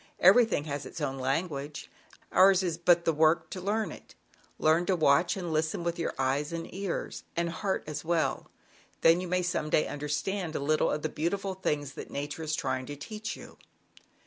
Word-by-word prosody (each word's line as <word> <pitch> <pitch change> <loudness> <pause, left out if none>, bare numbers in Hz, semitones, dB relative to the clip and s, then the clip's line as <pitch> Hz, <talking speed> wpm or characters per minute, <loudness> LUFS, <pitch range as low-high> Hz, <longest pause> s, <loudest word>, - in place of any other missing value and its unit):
Everything 205 -3 +5
has 145 -2 -4
its - - -8
own 135 -3 -2
language. 140 +1 -2 0.4
Ours 190 0 +6
is 175 -3 0
but 170 0 +4
the 165 - +3
work 160 +2 +3
to 185 - -5
learn 205 -1 -1
it: - - -13 0.4
learn 160 +2 +3
to 190 - +3
watch 165 +3 +3
and 175 -4 -3
listen 160 +4 0
kJ^^wWjy - - -6
with 170 0 -1
your 165 - -2
eyes 135 +3 0
and 165 0 -5
ears, 195 -1 -4
and 170 0 +1
heart 190 +4 -2
as 150 -1 -5
well, 160 -4 0 0.5
then 165 +2 +5
you 185 - -4
may 180 +1 +1
some 175 -3 -1
day 155 - +3
understand 155 +4 -3
a - - 0
little 155 +2 +2
of 150 - -2
the - - +1
beautiful 190 +6 -2
things 150 -7 -2
that - - -8
o - - -14
Nature 145 +3 -4
is 155 -1 -1
trying 130 -2 -2
to 145 - -5
teach 215 +8 -6
you." - - -13
165 Hz, 200 wpm, -29 LUFS, 145-180 Hz, 0.5 s, Ours